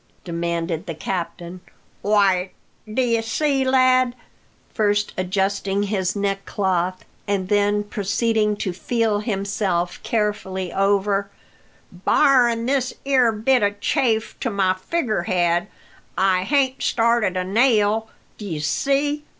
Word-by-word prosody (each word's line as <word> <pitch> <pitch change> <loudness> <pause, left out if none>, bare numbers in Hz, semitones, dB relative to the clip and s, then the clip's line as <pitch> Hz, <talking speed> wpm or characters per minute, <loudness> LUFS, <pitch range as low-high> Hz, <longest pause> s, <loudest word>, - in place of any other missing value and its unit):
demanded 170 0 -3
the 165 - -4
captain. 175 +1 -5 0.4
"Why, 195 -3 +2 0.4
dye 235 -1 +1
see, 270 +4 0
lad," 255 -1 +3 0.6
first 205 -1 +1
adjusting 195 +2 -1
his 195 -2 -1
neckcloth, 195 -2 -1 0.2
and 195 -2 -1
then 205 0 +2
proceeding 210 +1 0
to 190 -3 -3
feel 225 +2 0
himself 195 -4 -2
carefully 190 -4 -2
over, 200 0 +1 0.6
"barrin' 235 +4 +3
this 260 -1 0
'ere 260 -4 +4
bit 235 +4 +2
of 205 0 +2
a - - -24
chafe 225 -1 0
to 255 - -1
my 195 -3 +1
figgerhead, 185 - 0 0.5
I 185 -1 +2
hain't 270 -1 +1
started 230 -5 +1
a 185 - 0
nail, 220 +1 +2 0.3
d'ye 195 -7 -4
see. 280 - 0
205 Hz, 110 wpm, -22 LUFS, 185-235 Hz, 0.6 s, ere